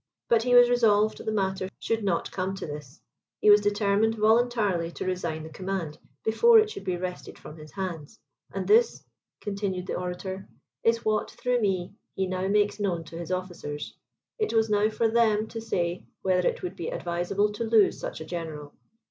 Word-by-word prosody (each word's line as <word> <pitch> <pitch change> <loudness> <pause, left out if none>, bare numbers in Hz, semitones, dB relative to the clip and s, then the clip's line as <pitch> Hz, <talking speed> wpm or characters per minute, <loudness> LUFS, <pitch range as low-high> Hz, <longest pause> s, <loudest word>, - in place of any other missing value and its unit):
But 230 -1 +4
he 245 +1 +2
was 245 0 +9
resolved 220 -3 +3
the 220 - -2
matter 190 -2 -1
should 225 -1 -2
not 180 -4 0
come 190 +1 -2
to 195 - -6
this; 150 0 -8 0.4
he 210 - +6
was 205 0 +7
determined 205 +2 +2
voluntarily 215 -5 +2
to - - -5
resign 170 -4 -2
the 160 - -8
command, 185 -3 -4 0.2
before 455 - +5
it 430 -1 +4
should 415 - -8
be 180 -1 -1
wrested 180 0 -6
from 150 - -11
his 155 -1 -13
hands; 185 -1 -5 0.3
and - - -4
this," 455 +2 +4 0.4
continued 195 -3 -3
the - - -4
orator, 185 +2 -5 0.3
"is 230 0 +2
what, 215 -1 +1
through 245 +1 -1
me, 190 -3 -1 0.2
he 190 - 0
now 185 0 -2
makes 205 +1 +2
known 180 -5 -1
to 165 +1 -10
his 170 +1 -6
officers. 175 -5 -5 0.4
It 430 - 0
was 225 -1 +2
now 210 +1 +3
for 225 +1 +1
them 220 -2 +3
to 225 - -6
say 175 -5 -2 0.2
whether 180 -1 +2
it - - -6
would 180 - -4
be 170 - -4
advisable 175 +4 -1
to 210 +3 -4
lose 220 -3 +3
such - - -5
a - - -6
general. 160 -4 -6
195 Hz, 190 wpm, -27 LUFS, 180-220 Hz, 0.4 s, was